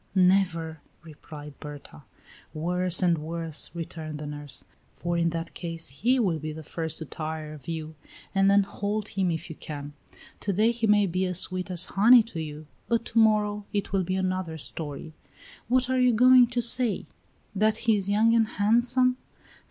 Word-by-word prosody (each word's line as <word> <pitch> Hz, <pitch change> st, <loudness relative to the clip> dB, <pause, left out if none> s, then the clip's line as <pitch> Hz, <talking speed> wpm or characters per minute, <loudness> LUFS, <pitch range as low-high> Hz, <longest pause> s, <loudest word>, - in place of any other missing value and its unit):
"Never," 180 Hz, -4 st, +2 dB, 0.2 s
replied 150 Hz, -2 st, -11 dB
Berta. 145 Hz, -, -10 dB, 0.5 s
"Worse 180 Hz, +3 st, 0 dB
and 170 Hz, -3 st, +3 dB
worse," 165 Hz, 0 st, -3 dB
returned 160 Hz, -2 st, -6 dB
the 150 Hz, -, -6 dB
nurse; 145 Hz, -1 st, -6 dB, 0.3 s
"for 175 Hz, 0 st, -2 dB
in 170 Hz, 0 st, +2 dB
that 165 Hz, 0 st, -5 dB
case 165 Hz, -4 st, -3 dB
he 235 Hz, -, +1 dB
will 185 Hz, -10 st, +1 dB
be 155 Hz, +1 st, -5 dB
the 155 Hz, +1 st, -8 dB
first 160 Hz, +1 st, -4 dB
to 160 Hz, -, -6 dB
tire 155 Hz, 0 st, -5 dB
of 145 Hz, -4 st, -13 dB
you, 160 Hz, -1 st, -5 dB, 0.4 s
and 195 Hz, 0 st, +4 dB
then 200 Hz, 0 st, +5 dB
hold 205 Hz, +1 st, -3 dB
him 190 Hz, -2 st, 0 dB
if 165 Hz, +1 st, -3 dB
you 160 Hz, -, -8 dB
can. 145 Hz, -1 st, -7 dB, 0.5 s
To 205 Hz, -, -1 dB
day 215 Hz, +5 st, +3 dB
he 235 Hz, -1 st, -1 dB
may 205 Hz, -1 st, +5 dB
be 185 Hz, +1 st, -1 dB
as 180 Hz, -1 st, +3 dB
sweet 185 Hz, 0 st, -2 dB
as 180 Hz, 0 st, +1 dB
honey 230 Hz, +4 st, +6 dB
to 200 Hz, -8 st, -6 dB
you, 155 Hz, 0 st, -7 dB, 0.2 s
but 230 Hz, -1 st, 0 dB
to 230 Hz, -, +1 dB
morrow 210 Hz, -2 st, +2 dB
it 200 Hz, -1 st, -2 dB
will 195 Hz, -1 st, +2 dB
be 185 Hz, +2 st, -2 dB
another 185 Hz, -3 st, -2 dB
story. 155 Hz, 0 st, -5 dB, 0.5 s
What 255 Hz, +1 st, +2 dB
are 260 Hz, 0 st, +1 dB
you 250 Hz, -1 st, +4 dB
going 250 Hz, +2 st, +7 dB
to 240 Hz, 0 st, -1 dB
say? 235 Hz, -3 st, +1 dB, 0.5 s
That 215 Hz, +2 st, +2 dB
he 225 Hz, -2 st, +4 dB
is 200 Hz, -1 st, -2 dB
young, 220 Hz, +3 st, +4 dB
and 225 Hz, -1 st, +3 dB
handsome? 240 Hz, +4 st, +2 dB
185 Hz, 185 wpm, -27 LUFS, 160-215 Hz, 0.5 s, going